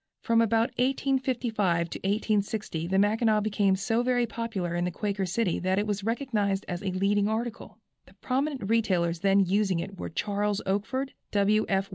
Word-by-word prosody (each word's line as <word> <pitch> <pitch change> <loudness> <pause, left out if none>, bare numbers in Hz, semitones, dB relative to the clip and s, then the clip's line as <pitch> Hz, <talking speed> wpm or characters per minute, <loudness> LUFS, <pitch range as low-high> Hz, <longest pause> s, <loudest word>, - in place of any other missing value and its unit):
From 230 0 +3
about 230 +2 +2
1855 245 -9 0
to - - -5
1860 205 -4 -1
the 190 +2 +1
Mackinaw 215 +2 +3
became 205 -2 +2
so 225 +5 0
very 245 -1 +2
popular 225 -7 -3
in 175 0 0
the 180 - 0
Quaker 195 +1 -2
City 190 0 0
that 185 +1 0
it 205 - +1
was 205 -1 -2
recognized 215 -4 -1
as 175 0 -4
a 200 - -2
leading 200 +2 +2
article. 225 +2 -4 0.3
The - - -20
prominent 265 -3 -2
retailers 180 -7 +1
then 195 +1 +4
using 195 0 +1
it 195 +2 -6
were - - -4
Charles 205 +3 -1
Oakford, 220 +8 -2 0.2
W. 210 +1 +3
F. 195 0 +1
205 Hz, 170 wpm, -27 LUFS, 195-230 Hz, 0.3 s, then